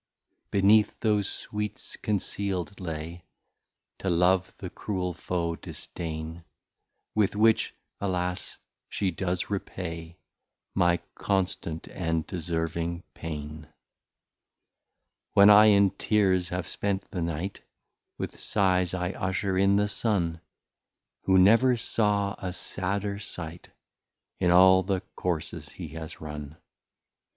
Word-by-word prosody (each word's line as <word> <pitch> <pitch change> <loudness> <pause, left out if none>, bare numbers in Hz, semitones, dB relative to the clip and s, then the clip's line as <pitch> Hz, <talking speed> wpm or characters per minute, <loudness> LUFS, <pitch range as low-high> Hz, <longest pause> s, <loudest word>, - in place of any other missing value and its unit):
Beneath 105 +2 +4
those 105 -3 +2
sweets 105 0 -5
conceal'd 100 -2 -2
lay, 85 0 -5 0.8
To 95 - -1
Love 90 +2 +2
the 90 - -7
cruel 90 -4 -3
Foe, 85 0 -2
Disdain, 80 0 -6 0.7
With 105 -2 +2
which 110 +1 +3 0.2
(alas) 90 -2 -2 0.3
she 95 -2 0
does 90 +2 -2
repay 85 -4 -5 0.6
My 90 -2 +3 0.2
Constant 90 -4 -1
and 80 -3 -2
Deserving 85 0 -2
Pain. 75 -1 -6 1.7
When 100 +1 +8
I 105 +1 +9
in 100 -2 +6
Tears 95 -4 +2
have 90 -1 -3
spent 100 -1 -1
the 90 - -3
Night, 85 +4 -3 0.6
With - - -5
Sighs 95 -3 +2
I 90 0 -1
usher 95 0 -1
in 100 +1 +4
the 105 +1 +3
Sun, 90 -7 0 0.8
Who 95 0 +5
never 115 +7 +6
saw 105 -3 +1
a 90 -2 -4
sadder 100 +3 -3
sight, 85 -3 -7 0.7
In 90 - +3
all 95 +1 +7
the 95 0 -1
Courses 85 -4 -3
he 85 -4 -8
has 80 0 -8
run. 75 -1 -7
90 Hz, 110 wpm, -28 LUFS, 85-100 Hz, 1.7 s, I